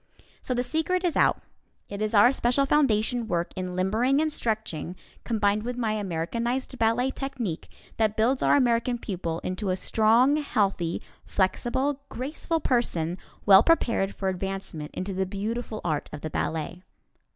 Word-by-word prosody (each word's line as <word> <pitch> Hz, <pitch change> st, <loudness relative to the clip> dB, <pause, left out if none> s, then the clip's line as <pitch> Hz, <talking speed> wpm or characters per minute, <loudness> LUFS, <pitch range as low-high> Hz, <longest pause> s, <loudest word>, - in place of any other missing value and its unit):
So 255 Hz, -, -2 dB
the 245 Hz, -, 0 dB
secret 320 Hz, +7 st, 0 dB
is 350 Hz, -3 st, 0 dB
out; -, -, +3 dB, 0.4 s
it 200 Hz, +1 st, -6 dB
is 215 Hz, +1 st, 0 dB
our 210 Hz, +5 st, +7 dB
special 270 Hz, +1 st, +2 dB
foundation 245 Hz, -5 st, +2 dB
work 170 Hz, -3 st, -1 dB
in 185 Hz, -1 st, -4 dB
limbering 220 Hz, +9 st, +2 dB
and 310 Hz, -1 st, +1 dB
stretching 210 Hz, -, -3 dB, 0.3 s
combined 210 Hz, -2 st, +1 dB
with 245 Hz, +2 st, -4 dB
my 225 Hz, -3 st, 0 dB
Americanized 230 Hz, +7 st, -2 dB
Ballet 230 Hz, +4 st, +2 dB
Technique 255 Hz, -, -4 dB, 0.3 s
that 220 Hz, -1 st, +1 dB
builds 245 Hz, +4 st, +2 dB
our -, -, +4 dB
American 240 Hz, -2 st, +2 dB
pupil 175 Hz, -7 st, -4 dB
into 185 Hz, +2 st, -3 dB
a 185 Hz, -, +2 dB
strong, 230 Hz, +8 st, +3 dB
healthy, 195 Hz, -, 0 dB, 0.2 s
flexible, 260 Hz, +8 st, 0 dB
graceful 305 Hz, +5 st, -3 dB
person, 180 Hz, -, 0 dB, 0.3 s
well 195 Hz, -1 st, +9 dB
prepared 230 Hz, -10 st, +2 dB
for 195 Hz, -, -3 dB
advancement 190 Hz, -5 st, -4 dB
into 190 Hz, +1 st, -3 dB
the 190 Hz, 0 st, -1 dB
beautiful 215 Hz, +3 st, -4 dB
art 155 Hz, -4 st, -1 dB
of 150 Hz, -, -7 dB
the 155 Hz, -, -5 dB
ballet. 160 Hz, +2 st, -3 dB
220 Hz, 150 wpm, -26 LUFS, 190-250 Hz, 0.4 s, well